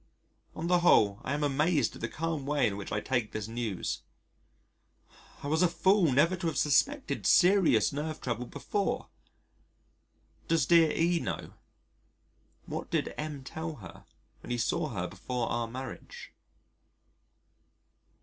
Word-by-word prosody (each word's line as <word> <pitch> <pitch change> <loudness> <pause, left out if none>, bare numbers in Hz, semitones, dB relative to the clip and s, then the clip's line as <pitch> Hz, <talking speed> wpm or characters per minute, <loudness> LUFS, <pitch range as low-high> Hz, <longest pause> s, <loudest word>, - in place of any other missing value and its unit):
On 160 - -4
the 175 0 +3
whole 105 - +4
I 135 - -2
am 150 - -2
amazed 145 -2 +1
at - - -11
the 115 - -1
calm 160 -2 -3
way 145 -2 +2
in 105 -3 0
which 100 -1 -7
I 105 - -1
take 120 -4 -1
this 110 -1 -4
news. 115 -5 -3 1.4
I - - -4
was 160 +3 +1
a 180 - +6
fool 185 -1 +3
never 150 +8 +3
to 170 -1 -3
have 160 - -2
suspected 275 - +1
serious 180 - +5
nerve 155 +2 -4
trouble 120 0 -3
before. 170 +10 -2 1.4
Does 165 -5 +2
dear 165 +2 +5
E 170 +1 +2
know? - - -5 1.1
What - - -5
did - - -1
M 150 -3 -5
tell 160 +4 -5
her 95 -10 -12 0.3
when - - -12
he 120 - -1
saw 155 +7 0
her 95 -8 -3
before 115 +7 -4
our 120 -1 -1
marriage? 130 +2 -8
145 Hz, 145 wpm, -30 LUFS, 120-165 Hz, 1.4 s, a